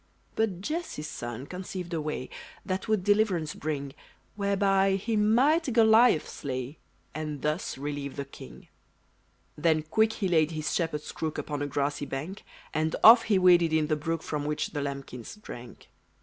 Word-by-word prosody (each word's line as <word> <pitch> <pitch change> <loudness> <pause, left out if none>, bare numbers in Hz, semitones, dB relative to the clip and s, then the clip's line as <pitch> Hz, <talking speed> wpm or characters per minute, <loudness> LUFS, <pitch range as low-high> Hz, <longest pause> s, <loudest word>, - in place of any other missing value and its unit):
But 205 -5 0
Jesse's 305 - -4
son 120 +2 -6
conceived 180 0 -6
a 160 - -1
way, 150 -4 -4 0.3
That 185 +2 -3
would 215 -4 +1
deliverance 195 -6 +2
bring; 140 -3 -4 0.4
Whereby 195 -1 +2
he 220 +4 -2
might 255 +9 +3
Goliath 225 -5 +5
slay, 130 +2 -5 0.3
And 150 -2 -5
thus 150 +2 -2
relieve 145 0 -4
the 140 - -4
king. 140 - -13 0.9
Then 155 0 +2
quick 220 +8 +2
he 195 - -2
laid 160 -3 +3
his 155 -1 -2
shepherd's 160 -4 -2
crook 160 -1 -4
Upon 145 -1 -4
a 145 - -1
grassy 145 +1 -2
bank; 155 +9 -5 0.3
And 155 +1 0
off 230 +2 +9
he 205 -3 +3
waded 175 -3 +5
in 155 -1 +2
the 155 - +2
brook 160 +2 -3
From 150 -1 -3
which 150 0 -1
the 145 - -3
lambkins 140 -4 -6
drank. 125 - -11
160 Hz, 160 wpm, -28 LUFS, 145-200 Hz, 0.9 s, off